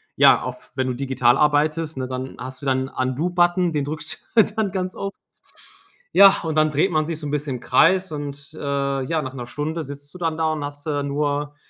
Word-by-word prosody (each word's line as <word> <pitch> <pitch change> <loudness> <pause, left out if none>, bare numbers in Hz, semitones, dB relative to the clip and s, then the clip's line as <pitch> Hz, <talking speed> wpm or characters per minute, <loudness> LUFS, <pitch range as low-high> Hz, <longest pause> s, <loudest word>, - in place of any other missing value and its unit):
ja, - - +6
auf - - -7
wenn 130 0 0
du 125 - -2
digital 130 -1 +2
arbeitest, 150 +1 +1
ne, 130 -1 -3
dann 130 +1 -5
hast 130 +2 -7
du - - -8
da - - +3
'n 130 +1 -2
Undo-Button, 175 +7 +1
den 145 -2 0
drückst 150 +2 -5 0.2
du 220 - +9
dann 215 -3 0
ganz 185 -1 -3
oft. 195 0 -4 1.0
Ja, 195 0 +8
und 160 -1 -2
dann 155 0 +4
dreht 155 +6 +1
man 155 -1 +1
sich 165 -2 -4
so 155 - -7
'n 145 - -3
bisschen 145 -2 -2
im - - -6
Kreis 185 +9 +3
und, 145 0 -7
äh, - - -10 0.4
ja, 155 +3 -1
nach 130 0 -6
1 125 -3 -7
Stunde 155 +6 -3
sitzt 145 0 -10
du 180 - -11
dann 165 -2 -1
da 160 -1 +1
und 150 -2 -4
hast 145 0 -7
da 145 -2 -1
nur 145 +1 -2
150 Hz, 225 wpm, -22 LUFS, 135-165 Hz, 1.0 s, du